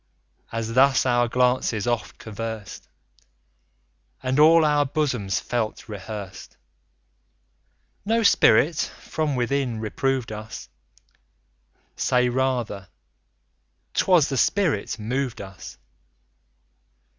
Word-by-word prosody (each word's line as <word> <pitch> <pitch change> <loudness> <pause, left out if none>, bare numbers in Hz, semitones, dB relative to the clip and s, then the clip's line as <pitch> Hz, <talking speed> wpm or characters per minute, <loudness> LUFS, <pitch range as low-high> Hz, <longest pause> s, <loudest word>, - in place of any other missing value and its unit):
As 115 0 -3
thus 130 -1 +4
our 120 -1 +2
glances 125 -3 +1
oft 120 -1 -2
convers'd, 110 -1 -7 1.4
And 130 +2 0
all 160 +1 +7
our 150 -1 +3
bosoms 130 -9 -1
felt 115 -3 -3
rehears'd, 105 -2 -8 1.5
No 225 +2 +1
spirit 155 - +4 0.2
from 155 -3 -2
within, 125 -1 -1
reprov'd 125 +2 -1
us, 110 - -8 1.3
Say 125 0 +2
rather, 120 -6 -1 1.1
"'twas 180 -6 +3
the 135 - -2
spirit 160 - +1
mov'd 125 +3 -3
us." 95 -1 -10
125 Hz, 85 wpm, -24 LUFS, 110-140 Hz, 1.5 s, all